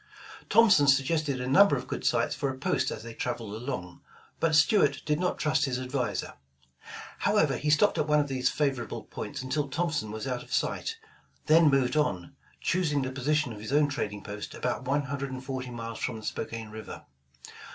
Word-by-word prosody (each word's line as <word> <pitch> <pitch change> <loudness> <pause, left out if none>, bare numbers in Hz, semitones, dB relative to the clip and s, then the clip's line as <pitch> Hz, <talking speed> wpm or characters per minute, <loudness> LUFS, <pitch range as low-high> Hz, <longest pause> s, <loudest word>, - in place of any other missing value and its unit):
Thompson 205 -11 +6
suggested 140 +1 +2
a 125 - -3
number 145 +6 +6
of 130 - -4
good - - -4
sites - - +2
for 140 - -2
a 130 - -5
post - - 0
as 110 - -6
they 115 0 -8
traveled 115 -3 -4
along, 110 -7 -5 0.4
but 165 -2 +2
Stuart 175 +8 +4
did 150 0 +1
not 180 0 0
trust 150 -2 +1
his 130 -2 -1
adviser. 125 -3 -2 0.9
However, - - +2
he 150 - -2
stopped 155 +8 +4
at 150 - +1
one 150 0 +4
of 145 - +1
these 130 -2 0
favor 140 -4 0
able - - -7
points - - -6
until 145 +3 -1
Thompson 155 -6 -1
was 110 +2 -5
out 125 -2 -2
of - - -14
sight, 450 0 -1 0.5
then 160 0 +6
moved 135 -2 +2
on, 95 - -1 0.3
choosing 155 -6 +1
the 130 - -3
position 140 0 0
of 105 - -9
his 110 +4 -6
own 145 0 +4
trading 105 -7 -4
post 105 0 -7
about 125 +1 -2
one 140 +3 +1
hundred 140 0 -4
and 130 0 -7
forty 130 -2 -4
miles 115 -2 -6
from 125 - -2
the 110 - -9
Spokane 110 0 -5
River. 110 0 -9
135 Hz, 195 wpm, -28 LUFS, 120-150 Hz, 0.9 s, Thompson